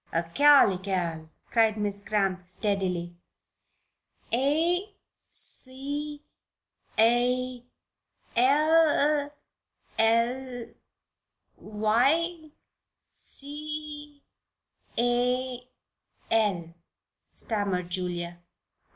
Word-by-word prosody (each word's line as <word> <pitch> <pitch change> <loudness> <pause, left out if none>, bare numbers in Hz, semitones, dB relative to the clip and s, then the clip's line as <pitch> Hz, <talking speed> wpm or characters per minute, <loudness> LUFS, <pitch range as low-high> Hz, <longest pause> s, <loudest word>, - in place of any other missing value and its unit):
"'Acalycal,'" 180 - +3 0.2
said 225 -2 +3
Miss 205 -1 -2
Cramp, 195 -3 -1
steadily. 185 -3 -2 1.2
"'A 335 - +1 0.4
c 290 +3 0 0.7
a 245 +2 +2 0.7
l 295 +2 +3 0.7
l 240 +2 +1 0.9
y 275 +11 +1 0.6
c 295 0 -4 0.7
a 245 +1 0 0.7
l,'" 195 -7 +1 0.6
stammered 195 -5 -2
Julia. 175 -1 -3
240 Hz, 50 wpm, -27 LUFS, 200-290 Hz, 1.2 s, Acalycal